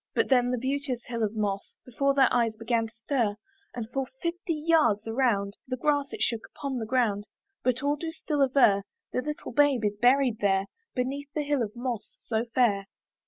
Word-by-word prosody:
But - - +2
then 245 -2 +4
the 250 - 0
beauteous 260 -1 -2
hill 235 -1 -4
of 215 0 0
moss 205 -2 -2
Before 275 +3 +1
their 270 -2 +5
eyes 230 -2 +2
began 225 0 0
to 225 - -17
stir; 235 -8 +1 0.4
And 235 -2 -3
for 260 +3 -3
full 260 - -30
fifty 340 0 -2
yards 300 -10 +2
around, 225 -4 +1
The 255 0 -2
grass 285 +1 +1
it - - -2
shook 230 -2 0
upon 275 -3 -3
the 220 - -4
ground; 215 -5 +1 0.3
But 255 +1 0
all 290 +1 +1
do 325 +2 -4
still 300 -2 -2
aver 255 -7 +5 0.3
The 250 - 0
little 300 +2 -5
babe 285 -6 +3
is 205 0 0
buried 250 -2 +4
there, 195 -1 +2 0.3
Beneath 275 +3 -2
that 300 - 0
hill 285 -2 +1
of 215 0 -3
moss 240 -2 -4
so 225 0 -1
fair. 230 -5 +2
250 Hz, 200 wpm, -28 LUFS, 225-280 Hz, 0.4 s, their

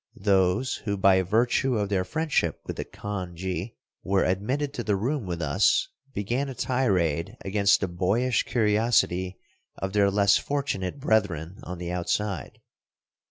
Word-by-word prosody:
Those 95 +5 +2
who 100 -2 -3
by 95 -1 +5
virtue 120 +6 +1
of 100 -2 -1
their 95 -2 +1
friendship 150 - -1
with - - -5
the - - -3
khanji 95 0 -5 0.3
were 95 0 +1
admitted 130 +11 -1
to 120 - -4
the 105 -3 +1
room 120 +3 -2
with 85 -2 -3
us 245 - +2 0.2
began 120 +6 -2
a 135 - -6
tirade 100 - 0
against 100 0 +3
the 95 - 0
boyish 100 +8 +1
curiosity 105 -5 +1 0.4
of 95 0 -4
their 100 -1 +4
less 100 0 +4
fortunate 140 -7 -2
brethren 100 - 0
on 90 -6 -7
the 90 0 -5
outside. 90 +1 -2
100 Hz, 145 wpm, -26 LUFS, 90-120 Hz, 0.4 s, by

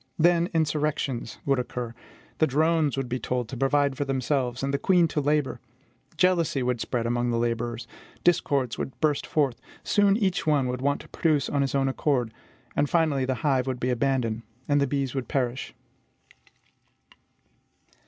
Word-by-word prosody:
Then 170 +1 +3
insurrections 150 -6 -1
would 135 -2 +2
occur. 120 -1 -4 0.5
The 155 - +4
drones 155 0 +2
would 135 -2 -1
be 125 +1 -2
told 125 -2 -2
to - - -5
provide 140 +2 +2
for 145 - -1
themselves, 130 -1 -1
and 140 0 -1
the 140 - +1
queens 175 -4 +3
to 150 - +1
labor; 145 -3 0 0.6
jealousy 170 -7 +2
would 125 -2 -1
spread 120 -2 -2
among 120 +1 0
the 120 - 0
laborers; 120 0 -2 0.4
discords 140 -8 +1
would 130 - -5
burst 150 -2 +1
forth; 140 -6 0 0.2
soon 205 -1 +3
each 190 -7 0
one 145 -3 +3
would 125 0 -3
want 140 +1 0
to - - -15
produce 150 -5 +1
on 145 - +1
his 135 0 -1
own 135 -1 +2
account; 130 -3 0 0.4
and 145 - +1
finally 155 -6 +2
the 130 0 0
hive 135 -3 +2
would 130 -2 -2
be 125 +1 0
abandoned, 125 -3 0 0.3
and 145 -1 +3
the 140 - +2
bees 135 -1 -1
would 135 -2 -3
perish. 130 -2 -2
135 Hz, 170 wpm, -26 LUFS, 125-150 Hz, 0.6 s, The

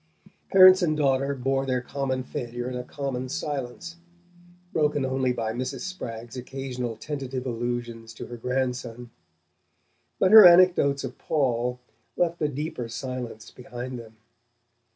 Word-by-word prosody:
Parents 185 0 +8
and 155 -3 +1
daughter 140 -1 +1
bore 135 +1 -1
their 130 -1 +1
common 130 0 -3
failure 120 -1 -5
in 130 - -4
a 125 - -4
common 130 -1 -4
silence, 145 +4 -5 0.8
broken 150 -3 +1
only 130 -1 0
by 115 -2 -2
Mrs. 130 +2 -4
Spragg's 120 -11 -7
occasional 125 -2 -5
tentative 135 0 -5
allusions 120 -1 -4
to - - -7
her 120 - -8
grandson. 125 -1 -3 1.1
But 190 - +3
her 220 -1 +11
anecdotes 175 -6 +6
of 130 -1 -7
Paul 125 -4 0 0.4
left 170 -1 0
a 150 - +2
deeper 145 -4 -5
silence 115 -2 -6
behind 125 0 -7
them. 110 -1 -13
130 Hz, 130 wpm, -26 LUFS, 120-140 Hz, 1.1 s, her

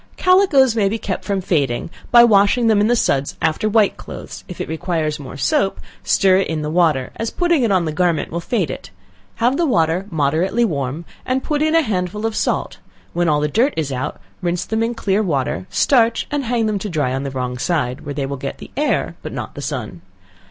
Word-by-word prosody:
Calicoes 360 - +4
may 205 -3 +2
be 225 - -2
kept 200 -4 -4
from 200 -2 -1
fading 145 -5 -1 0.2
by 235 0 +8
washing 215 +1 +4
them 215 -2 +4
in 210 - +3
the 240 - +3
suds 140 - 0
after 160 +7 0
white 210 -1 +3
clothes, - - -9
if 180 - -9
it - - -3
requires 160 -2 -2
more 135 -2 -8
soap, 140 +8 +1 0.2
stir 190 -1 +4
it 195 - +1
in 155 -1 -2
the 150 - -3
water, 160 -7 +2
as 225 - -2
putting 345 -4 +1
it 230 -4 +2
on 185 -3 +2
the 155 - -2
garment 170 -1 0
will 170 - -2
fade 175 - -1
it, - - -8 0.5
have 245 +4 +1
the 345 - +2
water 175 - +1
moderately 165 +8 +1
warm, 145 - -3 0.2
and 260 +1 -1
put 300 -1 -1
in 310 +1 +2
a 330 - +5
handful 205 - -2
of 225 -1 -1
salt, - - -1 0.3
when 175 -1 +1
all 150 -1 +2
the 150 - +1
dirt 240 - +1
is 150 -3 -1
out, 130 +3 -4 0.2
rinse 175 -1 -1
them 220 0 -1
in 230 +1 -1
clean 205 -1 0
water, 130 - -1
starch, 235 -4 +2
and 290 -2 -1
hang 235 -1 0
them 210 -2 0
to 210 - -4
dry 145 -7 -1
on 135 - -2
the 140 - -3
wrong 125 -2 -4
side, 130 -6 -1
where 145 0 -6
they 140 -1 -1
will 140 +1 -4
get 70 - -5
the - - -11
air - - 0
but - - -6
not - - -6
the - - -7
sun. - - -5
180 Hz, 225 wpm, -19 LUFS, 150-225 Hz, 0.5 s, by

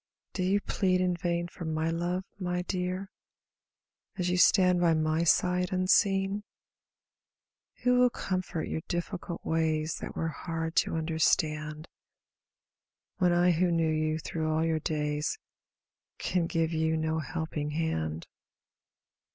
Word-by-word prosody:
Do 185 - -3
you 190 +3 +2
plead 185 -3 +1
in 180 -1 +1
yain 175 -1 -1
for 175 - -9
my 160 0 -1
love, 175 +2 -1 0.2
my 180 -1 -1
dear, 185 +1 -3 1.1
As 180 -2 0
you 180 - +1
stand 180 -1 +5
by 170 -2 +4
my 155 +1 +1
side 180 +1 +2
unseen? 195 +2 +2 1.4
Who 250 0 +4
will 250 0 +6
comfort 185 -7 -3
your 160 - -3
difScult 175 0 -4
ways 160 -1 0
That - - -7
were 165 - -1
hard 165 0 -4
to - - +2
understand. 155 -1 0 1.3
When 180 -2 +3
I 175 +1 +4
who 175 +2 +2
knew 165 -2 +2
you 155 0 0
through 160 0 -2
all 160 +1 +1
your 160 -1 +1
days. 150 - -1 0.8
Can 175 -2 0
give 165 -1 0
you 160 0 +1
no 160 0 0
helping 155 0 -3
hand? 80 - -2
165 Hz, 135 wpm, -29 LUFS, 160-180 Hz, 1.4 s, will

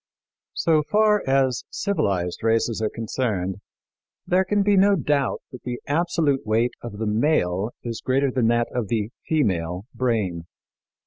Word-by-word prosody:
So 160 -2 +3
far 210 +6 +3
as 135 -2 +2
civilized 95 - -1
races 115 0 +1
are 110 - +1
concerned, 105 -5 -2 0.7
there 185 +1 +3
can 205 +2 +1
be 205 0 +3
no 200 +1 +5
doubt 145 -5 0
that 125 - -10
the 125 -1 -5
absolute 155 -3 +1
weight 115 +3 +1
of 115 -4 -7
the 110 - -2
male 105 - +1
is 115 -2 -5
greater 135 +1 +1
than 125 -3 +1
that 120 0 +2
of 120 -4 -1
the 110 0 -1 0.2
female 95 - 0
brain. 100 -9 -1
120 Hz, 145 wpm, -23 LUFS, 105-150 Hz, 0.7 s, no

